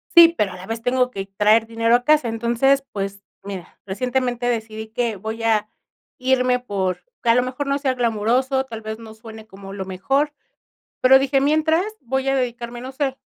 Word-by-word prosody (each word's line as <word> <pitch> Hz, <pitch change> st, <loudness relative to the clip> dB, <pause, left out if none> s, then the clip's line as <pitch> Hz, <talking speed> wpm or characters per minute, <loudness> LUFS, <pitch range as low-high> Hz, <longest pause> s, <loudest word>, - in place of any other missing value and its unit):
Sí, 335 Hz, -1 st, +9 dB
pero 200 Hz, -3 st, 0 dB
a -, -, -8 dB
la 180 Hz, -, -10 dB
vez 225 Hz, +2 st, -4 dB
tengo 250 Hz, +1 st, +1 dB
que 195 Hz, -3 st, -5 dB
traer 220 Hz, +2 st, +4 dB
dinero 230 Hz, +1 st, +2 dB
a 245 Hz, -, +1 dB
casa. 300 Hz, -1 st, +3 dB
Entonces, 240 Hz, +5 st, +2 dB
pues 200 Hz, 0 st, -4 dB, 0.2 s
mira, 195 Hz, -3 st, -8 dB
recientemente 245 Hz, +3 st, -1 dB
decidí 220 Hz, -2 st, -3 dB
que 230 Hz, -1 st, -1 dB
voy 220 Hz, +3 st, -5 dB
a 215 Hz, -2 st, +1 dB, 0.5 s
irme 255 Hz, -1 st, +2 dB
por 195 Hz, -6 st, -2 dB, 0.2 s
que 235 Hz, -, 0 dB
a 230 Hz, -, +6 dB
lo 250 Hz, -, +3 dB
mejor 255 Hz, +3 st, -4 dB
no 275 Hz, 0 st, +1 dB
sea 275 Hz, -2 st, 0 dB
glamoroso, 245 Hz, +3 st, +1 dB
tal 225 Hz, -4 st, -8 dB
vez 220 Hz, 0 st, -5 dB
no 225 Hz, -1 st, -11 dB
suene 220 Hz, 0 st, -12 dB
como 195 Hz, -1 st, -11 dB
lo 190 Hz, -1 st, -5 dB
mejor, 270 Hz, +11 st, 0 dB, 0.7 s
pero 265 Hz, +1 st, +7 dB
dije, 270 Hz, 0 st, +2 dB
mientras, 315 Hz, +5 st, +2 dB, 0.2 s
voy 265 Hz, +1 st, -2 dB
a 270 Hz, -, +2 dB
dedicarme, 240 Hz, -2 st, -3 dB
no 255 Hz, +2 st, -7 dB
sé, 270 Hz, -1 st, -2 dB
240 Hz, 195 wpm, -21 LUFS, 220-265 Hz, 0.7 s, Sí